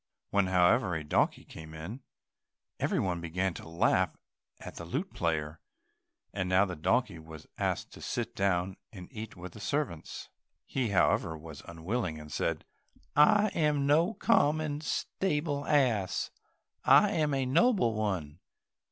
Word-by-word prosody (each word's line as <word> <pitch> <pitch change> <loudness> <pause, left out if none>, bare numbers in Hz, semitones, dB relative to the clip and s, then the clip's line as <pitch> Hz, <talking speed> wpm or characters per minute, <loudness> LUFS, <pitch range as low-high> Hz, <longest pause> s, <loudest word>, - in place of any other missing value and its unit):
When, 100 -2 +3
however, 90 -1 +3
a 80 - -3
donkey 75 - +1
came 80 0 -10
in, 95 +12 -7 0.8
every - - 0
one 90 -3 -1
began 90 +2 -1
to 80 - -9
laugh 85 - +2 0.4
at - - -9
the - - -6
lute 145 - -3
player. 80 -2 -2 0.7
And 95 -2 -2
now 95 +2 +5
the 90 -2 -5
donkey 80 +2 0
was 80 -1 -11
asked - - -1
to - - -12
sit - - -3
down 95 -1 0
and 90 -4 -10
eat 110 0 -7
with 90 +1 -8
the - - -11
servants. 105 - -3 0.4
He, 130 -3 -1
however, 85 -4 +2
was 80 -2 -10
unwilling, 85 0 -3
and 75 0 -11
said, 80 +1 -2 0.5
"I 205 +8 +6
am 150 -5 +1
no 165 +9 +3
common 150 -7 +2
stable 150 -4 -2
ass, 120 -10 +1 0.5
I - - +6
am 150 -3 +1
a 135 -1 0
noble 160 - +3
one." 95 -8 -2
95 Hz, 145 wpm, -30 LUFS, -, 0.8 s, I